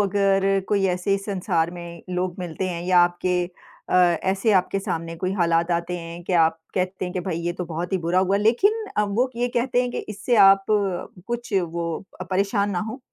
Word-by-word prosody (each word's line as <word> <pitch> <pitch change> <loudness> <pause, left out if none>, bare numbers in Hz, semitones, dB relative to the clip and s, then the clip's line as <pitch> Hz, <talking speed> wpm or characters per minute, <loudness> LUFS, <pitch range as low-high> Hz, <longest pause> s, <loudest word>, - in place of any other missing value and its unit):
अगर 195 -1 +2 0.3
कोई 200 -2 +2
ऐसे 180 +2 0
इस 195 0 -4
संसार 175 -4 0
में 170 -1 -9
लोग 180 0 -2
मिलते 180 +1 -3
हैं 170 -1 -4
या 180 -1 +4
आपके 175 0 +1
अ, 180 0 -9
ऐसे 190 +4 +3
आपके 195 +2 -4
सामने 165 -3 -4
कोई 185 +3 -2
हालात 170 -1 +2
आते 170 +1 -1
हैं 170 +1 -8
के 185 - -3
आप 160 0 0 0.2
कहते 185 0 -1
हैं 180 - -5
कि 185 - -1
भाई 175 -2 -3
ये 175 - 0
तो 180 0 -5
बहुत 170 +3 -5
ही 190 - +2
बुरा 180 +2 +2
हुआ। 190 +1 +2
लेक़िन 390 - +2
अ, 210 - +3
वो 235 +6 0
ये 245 +1 0
कहते 245 +1 +2
हैं 245 - -2
कि - - -4
इससे 210 +3 -1
आप 195 0 +5 0.6
कुछ 240 -2 -4
वो 170 0 -3 0.3
अ, - - -3
परेशान 200 +2 0
ना 180 - -1
हों 250 - -6
185 Hz, 210 wpm, -23 LUFS, 175-200 Hz, 0.6 s, आप